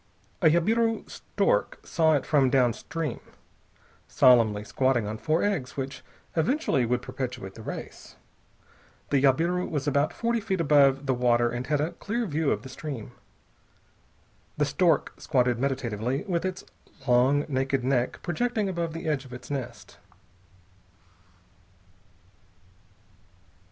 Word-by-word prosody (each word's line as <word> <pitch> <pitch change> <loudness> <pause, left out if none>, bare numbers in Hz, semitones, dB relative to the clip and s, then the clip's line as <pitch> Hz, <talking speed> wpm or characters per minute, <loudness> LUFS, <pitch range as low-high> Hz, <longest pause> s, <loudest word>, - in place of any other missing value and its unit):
A 165 - +5
jabiru 225 +8 +1
stork - - -1
saw 160 -1 +2
it 140 - -1
from 140 -4 +3
downstream, 130 +5 0 0.9
solemnly 115 -5 +4
squatting 130 0 +1
on 110 +1 -5
four 155 +2 +1
eggs 160 -12 -2
which 135 0 -5 0.3
eventually 165 - +1
would 125 +1 0
perpetuate 125 -6 -5
the 110 - -11
race. - - -8 1.0
The 140 -2 +3
jabiru 165 +7 +2
was 145 -1 -3
about 145 +1 +2
forty 235 0 -1
feet 195 -4 -2
above 140 -3 +4
the 135 - +1
water 120 -1 +2
and 120 +1 -4
had 150 -1 +1
a 155 +4 -1
clear 235 +3 -3
view 155 -4 0
of - - -1
the - - -8
stream. 130 -4 -7 1.5
The 150 - +2
stork 165 +2 +1
squatted 125 -5 +1
meditatively, 125 -1 -2
with 180 -4 -2
its 185 +1 -4 0.4
long, 130 +4 +4
naked 135 -2 -1
neck 125 -1 0
projecting 220 +4 -1
above 170 -3 -2
the 165 0 -6
edge 150 -4 0
of 130 -2 -12
its 125 - -9
nest. 120 -8 -6
140 Hz, 130 wpm, -27 LUFS, 125-165 Hz, 1.5 s, A